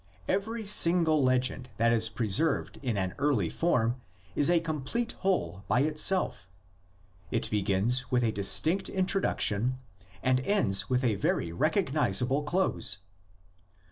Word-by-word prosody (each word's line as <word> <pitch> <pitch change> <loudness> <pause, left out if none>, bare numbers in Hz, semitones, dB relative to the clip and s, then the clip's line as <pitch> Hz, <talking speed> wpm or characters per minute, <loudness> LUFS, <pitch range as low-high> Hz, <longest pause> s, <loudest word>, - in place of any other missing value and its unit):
Every 220 +3 -2
single 170 -5 +3
legend 130 0 0
that 115 +1 +2
is 110 -1 +3
preserved 120 +8 0
in 120 -6 -2
an 95 -1 -2
early 130 - 0
form 125 -7 -1 0.3
is 145 - +3
a 175 -1 +4
complete 165 - -3
whole 180 - -2
by 125 - +2
itself; 155 - 0 0.8
it - - -1
begins 105 +5 0
with 125 -1 +1
a 115 - +1
distinct 155 - +2
introduc 190 +1 -1
tion 115 +5 0 0.5
and 130 0 +2
ends 105 - +1
with 125 +1 0
a 120 -4 +2
very 85 -3 -1
recognisable 135 - +1
close. 150 - +1
130 Hz, 130 wpm, -28 LUFS, 110-165 Hz, 0.8 s, a